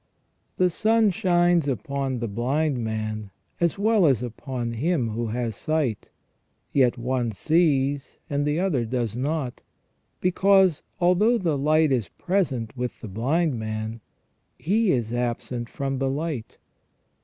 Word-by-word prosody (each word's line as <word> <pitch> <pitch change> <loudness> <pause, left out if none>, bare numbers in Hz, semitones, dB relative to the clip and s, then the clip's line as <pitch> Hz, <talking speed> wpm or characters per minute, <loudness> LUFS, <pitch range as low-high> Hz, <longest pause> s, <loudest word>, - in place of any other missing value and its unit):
f - - -46
The 180 0 +4
sun 220 +2 +3
shines 175 -4 +2
upon 135 +2 -2
the 115 - -1
blind 130 +6 0
man 110 -1 -3 0.3
as 170 +1 +1
well 210 -3 +4
as 130 -4 +2
upon 120 0 -4
him 135 0 0
who 115 +2 -2
has 115 -1 -2
sight, 150 -8 -1 0.6
yet 130 -3 +3
one 120 -1 -1
sees 145 - +1
and 145 0 -1
the 150 +2 0
other 175 -10 +1
does 115 -2 -2
not, 135 0 -2 0.6
because 190 -2 +4 0.2
although 185 +7 +4
the 170 -8 0
light 155 +2 +3
is 115 -9 0
present 135 - -1
with 125 -1 -4
the 115 - -6
blind 130 - 0
man, 110 +1 -4 0.6
he 210 +4 +2
is 120 -3 -1
absent 120 0 -2
from 135 -1 -3
the 135 0 0
light. 145 -4 -4
135 Hz, 140 wpm, -25 LUFS, 120-170 Hz, 0.6 s, The